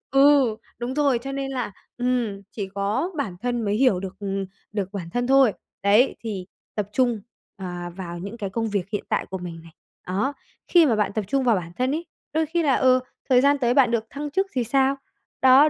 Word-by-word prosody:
Ừ, 275 -5 +6 0.2
đúng 240 +2 -3
rồi, 280 -4 +2
cho 270 +3 -5
nên 275 0 -3
là 250 -6 -2 0.3
ừm, 245 -5 0
chỉ 200 -3 -4
có 205 - 0
bản 210 -11 -2
thân 245 -1 -1
mới 205 0 +1
hiểu 225 -6 +4
được, 190 -1 -6
ừm, 195 -1 -2 0.3
được 200 -3 -2
bản 175 -4 -5
thân 245 +5 -1
thôi. 270 -5 +6 0.3
Đấy, 210 +6 +5
thì 200 -5 -5 0.3
tập 205 -2 -2
trung, 240 -5 +2 0.4
ờ, 190 -2 -5 0.3
vào 175 -2 -6
những 200 +6 -6
cái 200 -4 -3
công 225 +2 -1
việc 200 -2 -2
hiện 205 - -2
tại - - +1
của 190 - -5
mình 175 -2 -7
này, 165 - -14 0.4
đó, 200 +10 0 0.3
khi 345 -3 +6
mà 235 -6 +3
bạn 210 -1 0
tập 215 -2 -1
trung 275 +3 +1
vào 240 -3 +4
bản 170 -2 -5
thân 255 +1 +1
ấy, 325 +4 -2 0.3
đôi 320 0 +2
khi 335 +2 0
là, 275 -3 +4
ừ, 255 0 +5 0.3
thời 250 -1 +6
gian 285 +1 +4
tới 240 -1 +2
bạn 255 -3 +5
được 230 -2 +1
thăng 290 +1 -5
chức 385 +3 +1
thì 250 -2 +1
sao? 270 +3 +2 0.5
Đó, 265 +3 +7
240 Hz, 220 wpm, -24 LUFS, 200-270 Hz, 0.5 s, Đó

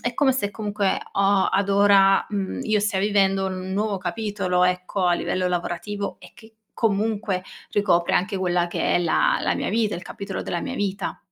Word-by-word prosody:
è 245 0 -2
come 270 +1 +3
se 225 -6 -1
comunque 205 -2 -1
ho 195 0 +3
ad 200 0 0
ora, 195 -1 +5
mhmm, 200 -3 -3
io 215 -1 +1
stia 205 -2 0
vivendo 195 -1 +2
un 185 0 -4
nuovo 205 0 -1
capitolo 185 -1 -1
ecco, 180 +1 -1
a 175 - +4
livello 185 +1 -1
lavorativo, 180 +3 -3
e - - -14
che 225 -1 -17 0.2
comunque 210 -3 0 0.3
ricopre 180 -4 +2
anche 190 +2 0
quella 180 -2 +1
che 175 - -1
è - - +4
la 340 - +2
la - - 0
mia - - -2
vita 220 -2 0
il 175 - -5
capitolo 195 0 -6
della 175 - -3
mia 260 - -4
vita. 200 -4 -3
195 Hz, 185 wpm, -23 LUFS, 185-210 Hz, 0.3 s, ora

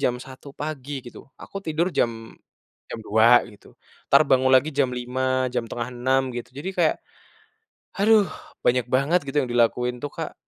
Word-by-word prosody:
jam 125 - +1
1:00 130 +2 -11
pagi, 145 -2 -5
gitu. - - -12
Aku 195 - -7
tidur 165 +2 -1
jam 115 -1 -2 0.6
jam - - -5
2.00 115 +3 +5
gitu, 105 - -18 0.4
entar 140 - +7
bangun 130 0 +3
lagi 135 +4 +4
jam 140 -3 +1
5.00, 130 +1 -1
jam 120 -2 -1
5:30 125 +3 -1
gitu. 120 - -6
Jadi 150 +7 -5
kayak, 170 -3 +2 1.0
haduh, 210 0 +5 0.4
banyak 125 -1 +2
banget 140 +7 +2
gitu, 135 +2 -5
yang 125 - -5
dilakuin 125 +1 +1
tuh 145 - -4
Kak. - - -5
130 Hz, 160 wpm, -24 LUFS, 120-145 Hz, 1.0 s, entar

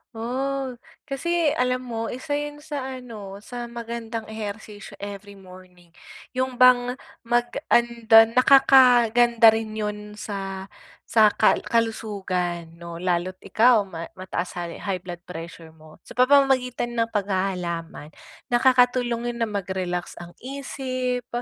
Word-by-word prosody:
Oh, 265 +3 -2 0.3
kasi 320 +2 0
alam 250 0 0
mo, 230 -2 -4
isa 275 +5 -7
yun 295 0 -7
sa 280 -4 -5
ano, 210 -5 -9
sa 240 +1 -6
magandang 235 -1 -6
ehersisyo 210 -1 -7
every 200 0 -9
morning. 185 -2 -16 0.4
Yung 255 0 -2
bang 250 0 +5 0.3
mag 240 0 +1 0.2
an 235 -1 +1
dan 225 0 +8
nakakaganda 245 -3 +6
rin 220 -1 -3
yun 210 -1 -5
sa, 195 -2 -6 0.3
sa 220 -2 +5
kal - - +4
kalusugan 185 -7 -2
'no, 170 0 -8
lalo't 180 +1 -1
ikaw 220 +3 +4
ma 170 -4 -8
mataas 185 -1 -5
hal 175 -1 -4
high 185 -3 -3
blood 175 -1 -7
pressure 165 -1 -9
mo. 155 0 -17
Sa - - -11
pamamagitan 255 -2 +3
ng 230 -1 0
paghahalaman, 185 -6 -3 0.4
nakakatulong 245 -1 +2
yun 235 - -1
na 220 - -3
mag-relax 185 -3 -3
ang 175 0 -10
isip, 255 -2 -4
225 Hz, 125 wpm, -24 LUFS, 190-250 Hz, 0.4 s, dan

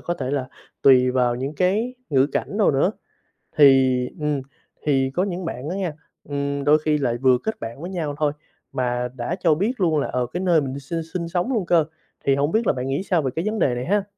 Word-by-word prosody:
có 175 - -2
thể 135 -6 -4
là 135 -2 -2 0.3
tùy 130 -2 +6
vào 125 -1 +2
những 135 +4 -4
cái 205 - +1 0.2
ngữ 135 -1 +4
cảnh 170 +7 -3
nào 210 - +4
nữa. 140 +7 +2 0.7
Thì, 135 -3 +6 0.2
ừm, 150 -2 -1 0.4
thì 135 -2 +2
có 180 - +1
những 185 -2 -3
bạn 145 -1 -5
đó - - -2
nha, 185 -5 -2 0.4
ừm, 140 0 -2
đôi 150 +2 +5
khi 155 0 +1
lại 120 -4 0
vừa 130 0 +4
kết 220 - -3
bạn 115 +5 -7
với 175 - -5
nhau 160 -6 -3
thôi 150 -1 +1 0.4
mà 125 -1 -1
đã 130 +8 -3
cho 165 -4 +3
biết 205 +10 0
luôn 160 -4 +3
là, - - -1
ờ, 125 -1 -1
cái 180 - -2
nơi 175 -4 +3
mình 135 0 -4
sinh 165 +5 -4
sinh 170 -2 -2
sống 175 +9 -1
luôn 215 -6 0
cơ, 170 -3 +3 0.4
thì 135 -1 +4
hổng 145 +2 0
biết 220 -1 +1
là - - +4
bạn 130 0 -4
nghĩ 140 +7 -1
sao 180 -4 +1
về 130 -3 -2
cái 165 +4 -2
vấn 215 0 -1
đề 125 -7 +2
này 125 +1 -3
ha? 205 +2 +1
145 Hz, 240 wpm, -23 LUFS, 130-175 Hz, 0.7 s, tùy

